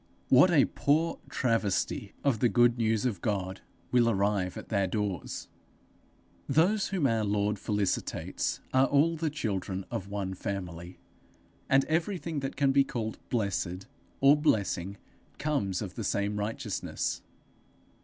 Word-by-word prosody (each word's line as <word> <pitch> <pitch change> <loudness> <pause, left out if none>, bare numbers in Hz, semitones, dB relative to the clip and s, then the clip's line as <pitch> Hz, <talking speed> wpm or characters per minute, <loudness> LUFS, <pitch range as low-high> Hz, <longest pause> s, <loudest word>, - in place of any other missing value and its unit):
What 135 +8 +7
a 155 -6 +5
poor 160 +4 +1
travesty 115 -6 0
of 135 -6 +2
the 120 - +3
good 120 0 +4
news 110 0 +1
of 105 -9 -1
God 95 -3 -2 0.3
will 120 -2 +4
arrive 100 -3 0
at - - -9
their 100 -3 +1
doors! 100 -4 -3 1.0
Those 185 +8 +3
whom 185 -7 0
our 115 -4 +2
Lord 105 0 0
felicitates 105 -3 -2
are 130 +1 +5
all 155 +4 +3
the 160 0 -1
children 100 -9 -3
of 95 - -3
one 100 -2 -3
family; 90 -2 -5 0.7
and 135 0 +4
everything 165 -1 -1
that 135 -1 -4
can 140 -1 +3
be 140 0 +5
called 115 -4 -4
blessed 100 -5 -1 0.4
or 140 +2 +7
blessing 100 - 0 0.4
comes 120 -12 -1
of 95 -3 -6
the 115 - -5
same 100 +1 -1
righteousness. 110 0 -3
110 Hz, 135 wpm, -29 LUFS, 100-140 Hz, 1.0 s, What